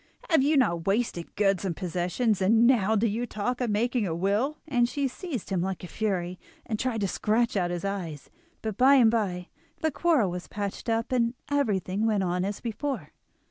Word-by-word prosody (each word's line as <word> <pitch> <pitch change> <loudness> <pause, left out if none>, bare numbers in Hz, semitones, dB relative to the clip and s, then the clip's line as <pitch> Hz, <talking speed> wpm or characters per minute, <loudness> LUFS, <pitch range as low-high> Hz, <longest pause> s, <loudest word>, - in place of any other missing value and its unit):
have 320 - +5
you 295 +2 +3
not 170 -10 +1
wasted 195 -4 -1
goods 195 -2 +2
and 180 -4 -2
possessions, 180 +4 0
and 225 +5 +5
now 220 -4 +4
do 220 +2 +2
you 230 +3 -2
talk 240 +4 -2
of 245 - 0
making 225 +1 +1
a 165 - -2
will?" 205 - 0
And 245 -5 +2
she 280 0 -1
seized 265 - -6
him 185 -3 +1
like 190 0 -3
a - - -5
fury, 185 -3 -2 0.3
and 215 -3 -3
tried 245 -4 -1
to 200 - +1
scratch 225 +5 +1
out 180 -3 +1
his 175 +2 -3
eyes. 175 -7 -5 0.3
But 220 -3 -3
by 270 +2 +6
and 235 -5 +6
by 190 -6 -1 0.3
the 315 - +1
quarrel 285 - +2
was 180 0 -6
patched 205 +2 -4
up, 230 +1 0
and 240 -1 +1 0.2
everything 210 -6 +1
went 210 -3 +1
on 180 0 0
as 200 +1 -3
before. 235 - -4
215 Hz, 200 wpm, -27 LUFS, 190-245 Hz, 0.3 s, by